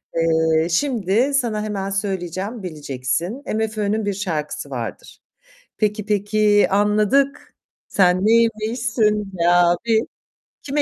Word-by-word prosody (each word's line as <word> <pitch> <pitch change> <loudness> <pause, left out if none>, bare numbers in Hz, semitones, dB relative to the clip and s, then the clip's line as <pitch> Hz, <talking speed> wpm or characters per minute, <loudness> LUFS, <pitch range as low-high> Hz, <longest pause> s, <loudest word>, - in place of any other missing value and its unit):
Eee, 160 0 +2
şimdi 235 +4 +1
sana 235 -6 0
hemen 200 -2 -3
söyleyeceğim, 195 +2 -3
bileceksin. 155 - -3
MFÖ'nün 215 -1 -1
bir 205 - -1
şarkısı 155 -7 -4
vardır. 115 -6 -7 0.6
"Peki, 210 -1 -1
peki, 210 0 +2
anladık. 210 +8 +1 0.3
Sen 180 -2 +3
neymişsin 220 -2 +1
be 170 +1 +2
abi?" 175 +6 +3 0.6
Kime 290 +1 0
205 Hz, 100 wpm, -21 LUFS, 175-220 Hz, 0.6 s, Sen